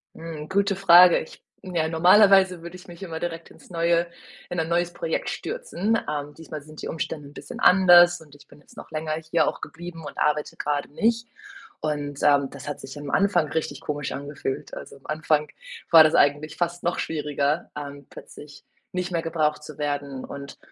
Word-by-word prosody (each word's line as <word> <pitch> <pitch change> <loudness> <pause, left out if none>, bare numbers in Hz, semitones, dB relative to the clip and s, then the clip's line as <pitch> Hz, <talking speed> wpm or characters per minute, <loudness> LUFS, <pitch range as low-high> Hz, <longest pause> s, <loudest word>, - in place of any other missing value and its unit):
Hm, 160 -2 -8
gute 200 0 +1
Frage. 180 -2 +7
Ich - - -12 0.2
ja, 170 -5 -1
normalerweise 185 +1 +5
würde 170 +1 -9
ich 180 - -15
mich 175 +2 -12
immer 165 -3 -6
direkt 165 -1 -5
ins - - -18
neue 170 0 +1 0.4
in 175 - -5
ein 160 0 0
neues 175 +1 0
Projekt - - -3
stürzen. 225 - -2
Ähm, 150 -1 -3
diesmal 155 -2 -9
sind 155 +1 -12
die - - -5
Umständen 155 -2 -5
'n - - -15
bisschen - - -9
anders 175 -2 +7
und 150 -2 -17
ich 145 - -19
bin 145 - -18
jetzt - - -21
noch - - -10
länger 155 0 -3 0.2
hier 170 - +3
auch - - -3
geblieben 165 -1 -9
und - - -9
arbeite 150 0 0
grade 145 -1 -2
nicht 230 +8 0 0.5
und, 145 -2 -3
ähm, 140 -2 +4
das 140 - -10
hat 145 -1 -5
sich 135 +2 -9
am 145 -1 -7
Anfang 180 -4 +2
richtig 150 -3 -3
komisch 145 -1 -3
angefühlt. 140 -1 -5
Also, - - -10
am 135 - -22
Anfang 155 0 0 0.4
war 165 -1 +10
das 155 - +3
eigentlich 145 +2 +2
fast 175 0 -2
noch 175 - -1
schwieriger, 150 0 -1
ähm, 140 -1 -8
plötzlich 145 -1 -13 0.3
nicht 180 0 -3
mehr 165 - 0
gebraucht 155 -2 -1
zu 150 -1 -10
werden 145 -2 -3
und 140 0 -9
160 Hz, 190 wpm, -24 LUFS, 145-175 Hz, 0.5 s, war